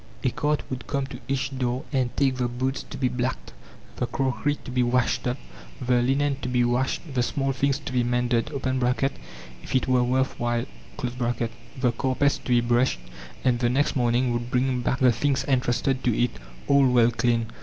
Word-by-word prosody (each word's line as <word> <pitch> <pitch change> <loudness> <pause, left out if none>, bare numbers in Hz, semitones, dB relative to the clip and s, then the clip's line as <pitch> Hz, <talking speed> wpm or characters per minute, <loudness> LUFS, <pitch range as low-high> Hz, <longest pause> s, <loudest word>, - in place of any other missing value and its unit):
A 130 - +2
cart 150 +3 0
would 130 0 -5
come 140 -2 -1
to 125 -2 -9
each 135 0 -1
door 125 +2 -1
and 130 -2 +2
take 135 -2 +2
the 125 -1 +1
boots 130 +3 -2
to - - -9
be 130 - +1
blacked, 125 +1 -3 0.4
the - - -1
crockery 135 +2 0
to - - -6
be 125 0 +1
washed 125 0 +1
up, 125 +2 -1 0.4
the 125 -2 +2
linen 135 +2 +1
to 125 - -3
be 125 -1 +2
washed, 130 +5 -1
the 125 - +1
small 135 +2 0
things 135 +1 +1
to - - -7
be 125 -1 +2
mended 120 +1 +1 1.1
(if - - -5
it 130 - +2
were 125 -1 +3
worth 130 +2 0
while), 120 0 0 0.3
the 120 0 -2
carpets 135 +2 +1
to - - -10
be 120 -1 +4
brushed, 120 - +2 0.4
and 125 -2 +2
the 120 -1 +2
next 135 +4 +1
morning 120 0 +2
would 120 0 -3
bring 125 0 +1
back 125 - 0
the 125 -1 +6
things 135 +4 0
entrusted 130 0 +1
to 120 -3 +1
it, 120 - +2 0.4
all 140 -2 +5
well 120 -1 +5
cleaned. 115 -1 0
125 Hz, 190 wpm, -25 LUFS, 120-135 Hz, 1.1 s, the